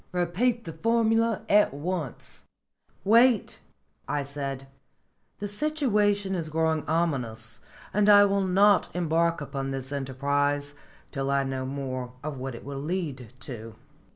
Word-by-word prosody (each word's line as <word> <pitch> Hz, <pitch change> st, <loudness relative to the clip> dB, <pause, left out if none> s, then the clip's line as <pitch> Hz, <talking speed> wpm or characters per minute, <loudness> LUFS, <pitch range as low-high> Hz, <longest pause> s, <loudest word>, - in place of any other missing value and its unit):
Repeat 205 Hz, +8 st, +1 dB
the 165 Hz, -, -7 dB
formula 225 Hz, +3 st, +2 dB
at 205 Hz, -8 st, +4 dB
once." 160 Hz, -2 st, -5 dB, 0.6 s
"Wait," 230 Hz, +1 st, +4 dB, 0.5 s
I 145 Hz, -1 st, -1 dB
said. 140 Hz, -1 st, -5 dB, 0.7 s
"The 205 Hz, -, -4 dB
situation 205 Hz, -6 st, +1 dB
is 165 Hz, -4 st, -3 dB
growing 160 Hz, 0 st, +1 dB
ominous, 125 Hz, -9 st, -1 dB, 0.3 s
and 210 Hz, +1 st, +3 dB
I 205 Hz, 0 st, +9 dB
will 200 Hz, 0 st, +1 dB
not 195 Hz, +1 st, +4 dB
embark 170 Hz, -1 st, +1 dB
upon 135 Hz, -1 st, -4 dB
this 135 Hz, 0 st, -4 dB
enterprise 145 Hz, +1 st, -1 dB, 0.4 s
till 135 Hz, -2 st, -2 dB
I 140 Hz, 0 st, +2 dB
know 130 Hz, -1 st, -3 dB
more 130 Hz, -2 st, -4 dB
of 150 Hz, -2 st, -4 dB
what 130 Hz, -1 st, -5 dB
it -, -, -11 dB
will 140 Hz, 0 st, -5 dB
lead 145 Hz, -, -4 dB
to." 115 Hz, -3 st, -7 dB
160 Hz, 130 wpm, -27 LUFS, 135-200 Hz, 0.7 s, I